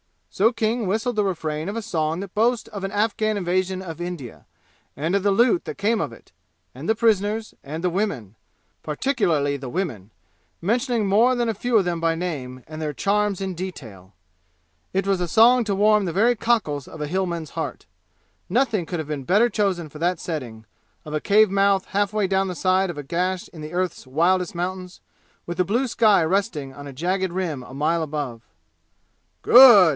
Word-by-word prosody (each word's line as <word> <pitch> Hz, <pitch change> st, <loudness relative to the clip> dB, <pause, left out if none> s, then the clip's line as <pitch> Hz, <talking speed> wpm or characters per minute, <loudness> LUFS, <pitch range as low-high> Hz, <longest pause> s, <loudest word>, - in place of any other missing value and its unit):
So 220 Hz, +4 st, +3 dB
King 225 Hz, -1 st, -1 dB
whistled 220 Hz, +4 st, -1 dB
the 210 Hz, -, +2 dB
refrain 160 Hz, -4 st, -3 dB
of 205 Hz, -, -5 dB
a 230 Hz, -, -2 dB
song 160 Hz, -3 st, -2 dB
that 195 Hz, -2 st, -8 dB
boasts 230 Hz, +2 st, +1 dB
of 200 Hz, -3 st, -7 dB
an 195 Hz, -, -4 dB
Afghan 215 Hz, +1 st, 0 dB
invasion 185 Hz, 0 st, -1 dB
of 165 Hz, -3 st, -8 dB
India, 175 Hz, -9 st, -7 dB, 0.5 s
and 155 Hz, +6 st, -2 dB
of 200 Hz, -1 st, +1 dB
the 205 Hz, -, +3 dB
loot 240 Hz, -, +3 dB
that -, -, -6 dB
came 215 Hz, +3 st, +1 dB
of -, -, -3 dB
it, -, -, -17 dB, 0.4 s
and 135 Hz, +6 st, -8 dB
the 220 Hz, -, +3 dB
prisoners, 220 Hz, -1 st, +1 dB
and 155 Hz, +4 st, -6 dB
the 180 Hz, -, +2 dB
women 165 Hz, -, -3 dB, 0.5 s
particularly 155 Hz, -, 0 dB
the 130 Hz, -2 st, -7 dB
women, 120 Hz, -, -4 dB, 0.5 s
mentioning 235 Hz, +3 st, 0 dB
more 225 Hz, +6 st, +4 dB
than 240 Hz, -1 st, 0 dB
a -, -, 0 dB
few 235 Hz, +3 st, +1 dB
of 200 Hz, -, +4 dB
them 175 Hz, -1 st, -1 dB
by 165 Hz, 0 st, +1 dB
name, 135 Hz, -8 st, -5 dB
and 155 Hz, +1 st, -8 dB
their 150 Hz, -1 st, -2 dB
charms 200 Hz, +4 st, 0 dB
in 190 Hz, -1 st, -2 dB
detail. 115 Hz, -, -8 dB, 0.8 s
It 195 Hz, 0 st, 0 dB
was 195 Hz, -2 st, +1 dB
a 175 Hz, -, -1 dB
song 235 Hz, +6 st, +5 dB
to 200 Hz, -2 st, 0 dB
warm 210 Hz, 0 st, +4 dB
the 170 Hz, -, -3 dB
very 230 Hz, +6 st, +3 dB
cockles 210 Hz, -, 0 dB
of 160 Hz, -, -10 dB
a 150 Hz, -, -2 dB
Hillman's 170 Hz, -2 st, -2 dB
heart. -, -, -5 dB, 0.6 s
Nothing 220 Hz, -5 st, +1 dB
could 175 Hz, -, -3 dB
have 155 Hz, -1 st, -5 dB
been 145 Hz, -3 st, -4 dB
better 210 Hz, -, +4 dB
chosen 195 Hz, -7 st, -1 dB
for 150 Hz, -, -11 dB
that 175 Hz, +2 st, +1 dB
setting, 120 Hz, -10 st, -6 dB, 0.4 s
of 150 Hz, -, -7 dB
a 155 Hz, -, -1 dB
cave 210 Hz, 0 st, +4 dB
mouth 195 Hz, -1 st, +2 dB
half 205 Hz, 0 st, 0 dB
way 210 Hz, -2 st, +1 dB
down 190 Hz, 0 st, +1 dB
the 180 Hz, -, -4 dB
side 185 Hz, +1 st, +2 dB
of 170 Hz, -, -6 dB
a 145 Hz, -, -5 dB
gash 180 Hz, +5 st, -2 dB
in 155 Hz, -3 st, -10 dB
earth's 175 Hz, -2 st, -3 dB
wildest 175 Hz, +6 st, +1 dB
mountains, 180 Hz, +1 st, -5 dB, 0.4 s
with 175 Hz, -, -5 dB
the 180 Hz, -, +2 dB
blue 240 Hz, +8 st, 0 dB
sky 215 Hz, -6 st, +4 dB
resting 160 Hz, -6 st, -1 dB
on 145 Hz, +1 st, -10 dB
a 140 Hz, -, -8 dB
jagged 185 Hz, +6 st, -1 dB
rim 175 Hz, -7 st, -2 dB
a 125 Hz, -, -12 dB
mile 155 Hz, +4 st, 0 dB
above. 145 Hz, -7 st, -4 dB, 1.0 s
"Good!" 245 Hz, -4 st, +9 dB
185 Hz, 195 wpm, -23 LUFS, 155-210 Hz, 1.0 s, Good